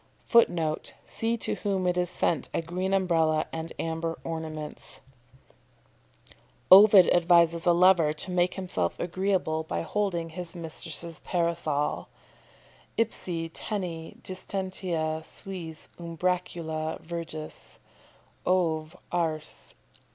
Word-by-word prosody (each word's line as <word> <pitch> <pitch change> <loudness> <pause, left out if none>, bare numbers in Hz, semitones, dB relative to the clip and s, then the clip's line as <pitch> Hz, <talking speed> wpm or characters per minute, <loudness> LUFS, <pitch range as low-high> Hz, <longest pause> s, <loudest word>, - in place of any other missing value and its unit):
[Footnote: 170 -9 +2
"See 230 +1 0
to - - -1
whom 195 -3 -1
it 180 0 +2
is 180 -1 +1
sent 170 - 0
a - - +1
green 180 +3 -2
umbrella 165 -5 +2
and 165 0 -4
amber 165 0 -2
ornaments"] 160 -2 -6 1.7
Ovid 195 -1 +10
advises 170 -1 +4
a - - +7
lover 175 -3 +5
to 155 +4 -5
make 180 0 +2
himself 180 - -2
agreeable 180 -3 0
by 160 - -3
holding 170 -3 -1
his 175 +1 -5
mistress's 165 0 -3
Parasol: 170 -4 -1 0.9
"Ipse 170 -7 -1
tene 175 -6 -4
distenta 185 -4 -2
suis 165 -4 -6
umbracula 170 -2 -2
virgis" 160 -2 -7 0.7
_Ov. 165 -3 +1 0.2
Ars. 160 -3 -2
170 Hz, 100 wpm, -28 LUFS, 160-185 Hz, 1.7 s, Ovid